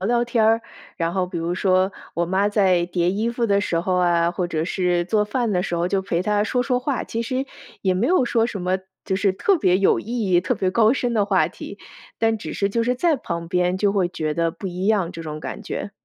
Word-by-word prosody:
聊 190 - -2
聊 240 0 +2
天。 225 -1 +3 0.4
然 165 +1 -1
后 185 -1 0
比 180 - -5
如 170 +2 -2
说， 185 0 +2 0.2
我 170 0 -1
妈 190 +3 +1
在 190 -4 +3
叠 175 0 0
衣 220 +4 -1
服 235 -1 -1
的 200 -1 +3
时 165 -4 0
候 185 +1 -1
啊， 170 -1 +2
或 175 0 -2
者 160 -1 -2
是 180 -2 +1
做 210 +2 +2
饭 235 +2 -1
的 180 -3 +1
时 175 - -3
候， 170 +1 0
就 190 0 0
陪 175 -3 -1
她 210 +2 +1
说 245 +2 0
说 250 -1 0
话。 265 0 -2
其 230 +1 -3
实 260 +3 -2 0.3
也 185 -2 +1
没 210 +7 +1
有 365 -4 +3
说 230 -1 +2
什 200 -5 -5
么 185 +1 0 0.3
就 190 - -1
是 195 -1 +2
特 380 - +2
别 185 - +2
有 195 - +3
意 225 -4 -3
义、 175 - +5
特 165 - 0
别 185 -1 0
高 225 +3 +4
深 245 -3 -1
的 210 -3 +3
话 190 -6 +2
题， 200 +3 -10 0.4
但 225 0 +2
只 - - -7
是 200 - 0
就 230 +3 0
是 250 +2 +1
在 315 +3 +2
旁 170 -7 -5
边 180 0 +1
就 200 -1 +2
会 190 -4 +1
觉 155 -3 -2
得 170 0 +1
不 195 - -8
一 180 +1 -4
样， 200 -5 +2
这 165 - -8
种 155 -1 -6
感 - - -6
觉。 - - -5
190 Hz, 275 characters per minute, -22 LUFS, 175-225 Hz, 0.4 s, 义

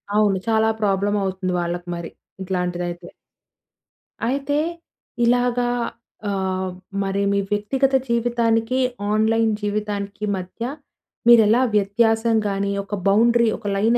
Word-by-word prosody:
అవును. 210 -2 +3
చాలా 220 0 +3
ప్రాబ్లమ్ 205 0 +1
అవుతుంది 185 -1 -2
వాళ్ళకి 175 +1 -4
మరి. 170 -1 -6 0.3
ఇట్లాంటిదైతే. 180 -2 -3 1.2
అయితే, 280 +4 0 0.7
ఇలాగా 245 0 +2 0.6
ఆహ్, 190 -1 -1 0.3
మరి 195 +1 -1
మీ 200 - +2
వ్యక్తిగత 265 +6 +1
జీవితానికి, 235 +1 +1 0.3
ఆన్‌లైన్ 220 +1 +2
జీవితానికి 205 0 -3
మధ్య 185 +5 -7 0.7
మీరెలా 230 +1 +6
వ్యత్యాసం 225 +3 +2
గాని 200 0 -1
ఒక 205 +1 -4
బౌండరీ 235 +3 +4
ఒక 220 - -19
లైన్ 225 +4 +3
210 Hz, 105 wpm, -22 LUFS, 195-235 Hz, 1.2 s, మీరెలా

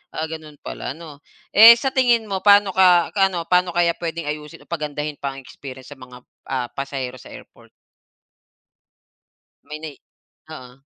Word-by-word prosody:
Ah, 160 - -2
gano'n 155 -2 -9
pala. 140 - -6
Ano, 155 -4 -12 0.3
eh, 225 +3 +10
sa 270 +2 -2
tingin 240 -3 +3
mo 195 -2 -3
paano 205 -1 +5
ka 180 -3 +4
ano, 190 -4 +1
paano 180 0 +2
kaya 170 -1 +3
puwedeng 170 -1 -5
ayusin 150 +2 -10
o - - -43
pagandahin 150 -2 -4
pa 135 -1 -4
ang 135 - -11
experience 130 0 -12
sa 135 - -20
mga, 125 -1 -14 0.3
ah, 130 -2 -2
pasahero 135 -2 -5
sa - - -14
airport? - - -17 1.9
May 150 0 -8
nai 155 -2 -9 0.6
oo. 125 0 -14
155 Hz, 160 wpm, -21 LUFS, 140-185 Hz, 1.9 s, eh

